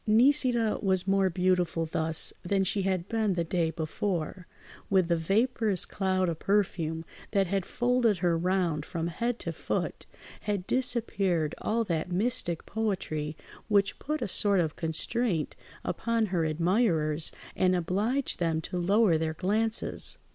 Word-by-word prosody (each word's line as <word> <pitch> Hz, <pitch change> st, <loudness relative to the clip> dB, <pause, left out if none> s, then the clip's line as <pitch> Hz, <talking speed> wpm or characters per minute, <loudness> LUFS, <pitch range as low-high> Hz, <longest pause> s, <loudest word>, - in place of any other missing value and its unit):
Nisida 240 Hz, -1 st, +3 dB
was 190 Hz, -2 st, +1 dB
more 195 Hz, -1 st, +3 dB
beautiful 180 Hz, -2 st, +1 dB
thus 160 Hz, 0 st, 0 dB
than 195 Hz, +2 st, +1 dB
she 195 Hz, +2 st, 0 dB
had 185 Hz, -2 st, -1 dB
been 220 Hz, -4 st, 0 dB
the 170 Hz, -, 0 dB
day 170 Hz, -1 st, 0 dB
before; 170 Hz, +2 st, -3 dB, 0.4 s
with 185 Hz, -3 st, +3 dB
the 170 Hz, -, +4 dB
vaporous 210 Hz, +3 st, +1 dB
cloud 185 Hz, -1 st, 0 dB
of 165 Hz, -2 st, -2 dB
perfume 170 Hz, -5 st, 0 dB, 0.3 s
that 195 Hz, -2 st, +3 dB
had 195 Hz, 0 st, -1 dB
folded 240 Hz, -4 st, +2 dB
her 175 Hz, -1 st, +1 dB
round 175 Hz, -3 st, 0 dB
from 165 Hz, +1 st, -4 dB
head 235 Hz, +8 st, -2 dB
to -, -, -4 dB
foot -, -, -3 dB, 0.3 s
had 205 Hz, -4 st, -2 dB
disappeared 195 Hz, -, 0 dB
all 230 Hz, +2 st, +1 dB
that 170 Hz, -4 st, -2 dB
mystic 190 Hz, -3 st, -1 dB
poetry 160 Hz, -8 st, -2 dB, 0.3 s
which 200 Hz, -2 st, +2 dB
put 305 Hz, -2 st, -2 dB
a -, -, -1 dB
sort 200 Hz, 0 st, +2 dB
of 160 Hz, -3 st, 0 dB
constraint 165 Hz, +2 st, 0 dB, 0.3 s
upon 230 Hz, -1 st, 0 dB
her 165 Hz, -3 st, +2 dB
admirers 160 Hz, -2 st, +1 dB, 0.2 s
and 185 Hz, 0 st, +3 dB
obliged 205 Hz, +10 st, 0 dB
them 165 Hz, -2 st, +1 dB
to 180 Hz, +3 st, -4 dB
lower 190 Hz, -1 st, +3 dB
their 160 Hz, -1 st, -2 dB
glances. 215 Hz, +5 st, +1 dB
185 Hz, 145 wpm, -29 LUFS, 165-215 Hz, 0.4 s, the